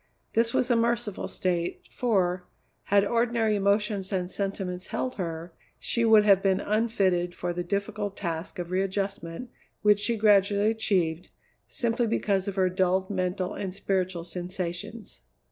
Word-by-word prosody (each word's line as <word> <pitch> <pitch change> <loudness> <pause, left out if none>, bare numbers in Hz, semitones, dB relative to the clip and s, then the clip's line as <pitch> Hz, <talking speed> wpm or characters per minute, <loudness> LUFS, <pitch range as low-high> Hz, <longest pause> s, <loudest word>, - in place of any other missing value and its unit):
This 230 +1 +3
was 250 +1 +1
a - - +5
merciful 230 -3 0
state, 175 -2 -2
for, 185 -7 0 0.4
had 200 0 +4
ordinary 230 -1 +1
emotions 200 0 +1
and 185 -2 -1
sentiments 190 -2 -3
held 255 - -2
her, 165 -2 -4 0.2
she 235 - -1
would 220 -2 +6
have 195 -2 +6
been 195 -1 +2
unfitted 195 -5 +1
for 175 0 -3
the 175 0 -3
difficult 200 +2 -3
task 165 -3 -4
of 175 -1 -5
readjustment 195 +2 -2 0.3
which 210 -1 +5
she 230 +2 +1
gradually 205 0 +4
achieved, 180 -7 0 0.4
simply 235 0 0
because 200 -3 0
of 200 - -3
her 190 -2 +3
dulled 185 +1 +1
mental 185 0 -1
and 190 -2 -5
spiritual 185 -3 -1
sensations. 180 +4 -6
195 Hz, 145 wpm, -27 LUFS, 180-215 Hz, 0.4 s, would